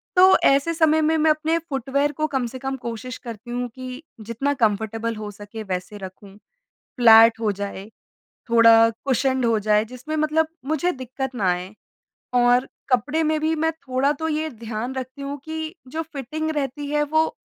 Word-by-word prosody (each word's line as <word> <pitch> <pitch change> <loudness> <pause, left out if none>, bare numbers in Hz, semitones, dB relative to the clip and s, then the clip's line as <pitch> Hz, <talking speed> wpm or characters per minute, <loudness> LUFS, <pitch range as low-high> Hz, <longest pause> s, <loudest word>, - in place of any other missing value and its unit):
तो 375 +1 +7
ऐसे 280 +5 +3
समय 315 -1 +3
में 315 +1 +2
मैं 310 0 +4
अपने 315 +2 +1
फुटवियर 280 +1 0
को 310 +2 -1
कम 265 -4 -1
से 255 +2 -8
कम 270 +1 -3
कोशिश 240 +1 -6
करती 235 0 -9
हूँ 245 0 -2
कि 255 +3 -8 0.2
जितना 230 +6 -2
कंफ़र्टेबल 225 0 -1
हो 210 -1 -6
सके 205 +2 -9
वैसे 185 +1 -5
रखूँ, 195 +1 -11 0.6
फ्लैट 225 -1 +7
हो 215 -2 +1
जाए, 200 0 -6 0.6
थोड़ा 230 -1 +7 0.2
कुशन्ड 260 -1 +1
हो 230 -1 +2
जाए 210 +1 +2
जिसमें 255 +6 -6
मतलब 310 +1 +1 0.2
मुझे 315 +4 0
दिक्कत 260 -1 -6
ना 195 -5 +1
आए 180 +3 -4 0.6
और 245 +1 +4 0.2
कपड़े 290 +7 +2
में 310 0 +1
भी 315 +1 +1
मैं 320 +1 +1 0.2
थोड़ा 260 +3 +2
तो 320 +2 -4
ये 310 0 -1
ध्यान 230 +1 -5
रखती 260 +1 -6
हूँ 280 +1 -5
कि 315 +1 -5
जो 320 +5 -3
फ़िटिंग 310 +1 -5
रहती 290 -1 -3
है। 295 0 +1
वो 315 +2 +1
260 Hz, 175 wpm, -23 LUFS, 225-305 Hz, 0.6 s, तो